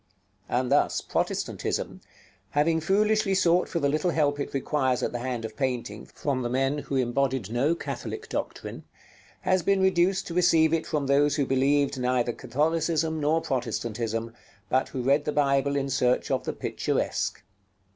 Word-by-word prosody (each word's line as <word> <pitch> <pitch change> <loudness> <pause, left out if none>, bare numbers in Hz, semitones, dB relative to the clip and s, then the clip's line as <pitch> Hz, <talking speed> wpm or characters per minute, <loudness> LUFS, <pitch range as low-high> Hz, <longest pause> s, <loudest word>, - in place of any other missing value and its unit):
And 125 0 0
thus - - +3
Protestantism, - - -2 0.5
having 160 +3 +2
foolishly 210 +3 +2
sought 180 -1 +3
for 170 - -1
the 140 - +1
little 155 +5 +1
help 145 -3 +1
it 140 - -3
requires 130 -2 0
at - - 0
the 120 - -4
hand 120 -2 -3
of 110 -1 -7
painting 120 -5 -3
from 135 -3 -2
the 120 - -2
men 135 +3 0
who 140 - -4
embodied 130 -3 0
no 135 +8 +2
Catholic 435 - -6
doctrine, - - -5 0.6
has 185 -1 +2
been 195 +3 +2
reduced 190 0 +2
to 170 - -6
receive 165 -2 +4
it 165 -1 0
from 150 -2 -1
those 140 +1 +3
who 145 - +1
believed 135 +1 +2
neither 125 -1 +1
Catholicism 160 +5 0
nor 155 +2 +2
Protestantism, 115 -3 -3 0.4
but 130 +1 +1
who 130 - -4
read 140 +3 +2
the 150 - 0
Bible 140 -1 +2
in 140 -1 0
search 125 -2 +1
of - - 0
the - - -2
picturesque. - - -2
140 Hz, 165 wpm, -26 LUFS, 130-160 Hz, 0.6 s, receive